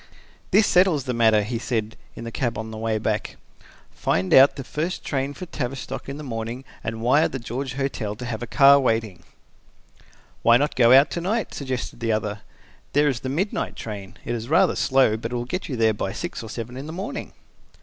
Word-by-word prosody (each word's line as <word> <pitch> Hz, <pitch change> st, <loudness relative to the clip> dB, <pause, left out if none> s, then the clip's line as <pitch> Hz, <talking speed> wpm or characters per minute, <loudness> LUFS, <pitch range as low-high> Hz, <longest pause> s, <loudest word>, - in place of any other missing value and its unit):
"This 205 Hz, +2 st, +5 dB
settles 180 Hz, -6 st, +3 dB
the 125 Hz, -, -2 dB
matter," 110 Hz, -3 st, +4 dB
he 115 Hz, +2 st, -3 dB
said, 110 Hz, -3 st, -2 dB, 0.2 s
in -, -, -8 dB
the 115 Hz, -, -6 dB
cab 120 Hz, -2 st, -2 dB
on 110 Hz, 0 st, -5 dB
the 110 Hz, -, -7 dB
way 110 Hz, -1 st, 0 dB
back. 105 Hz, -1 st, -2 dB, 0.5 s
"Find 90 Hz, +1 st, 0 dB
out 135 Hz, +2 st, +8 dB
the 135 Hz, -, -6 dB
first 160 Hz, +7 st, -3 dB
train 140 Hz, 0 st, -2 dB
for 185 Hz, -, -7 dB
Tavistock 135 Hz, -5 st, -5 dB
in 140 Hz, -, -5 dB
the 150 Hz, -, -7 dB
morning 115 Hz, 0 st, -5 dB, 0.2 s
and 110 Hz, 0 st, -4 dB
wire 145 Hz, +6 st, +4 dB
the 135 Hz, -, -5 dB
George 125 Hz, +2 st, -5 dB
Hotel 130 Hz, -6 st, -2 dB
to 125 Hz, -, -7 dB
have 115 Hz, -2 st, -4 dB
a 120 Hz, -, -4 dB
car 140 Hz, +2 st, +7 dB
waiting." 110 Hz, -7 st, -1 dB, 1.2 s
"Why 115 Hz, 0 st, +6 dB
not 145 Hz, +3 st, 0 dB
go 130 Hz, +2 st, +7 dB
to 170 Hz, -, -5 dB
night?" 210 Hz, +3 st, -1 dB
suggested 130 Hz, -3 st, -4 dB
the 115 Hz, -1 st, 0 dB
other. 110 Hz, -1 st, -2 dB, 0.5 s
"There 145 Hz, +1 st, +4 dB
is 130 Hz, -4 st, -2 dB
the 130 Hz, -, -5 dB
midnight 180 Hz, +10 st, -2 dB
train. 100 Hz, -2 st, -7 dB
It -, -, -2 dB
is 115 Hz, +1 st, -5 dB
rather 180 Hz, +3 st, +4 dB
slow, 130 Hz, -5 st, +3 dB
but 115 Hz, +2 st, -5 dB
it -, -, -1 dB
will 120 Hz, 0 st, -2 dB
get 185 Hz, +9 st, -4 dB
you 130 Hz, -, -2 dB
there 110 Hz, -2 st, +3 dB
by 95 Hz, -2 st, -3 dB
six 175 Hz, -, -5 dB
or 110 Hz, -, -8 dB
seven 120 Hz, +2 st, -6 dB
in 135 Hz, +3 st, -6 dB
the 160 Hz, -, -6 dB
morning." 205 Hz, +11 st, -5 dB
125 Hz, 210 wpm, -24 LUFS, 110-140 Hz, 1.2 s, out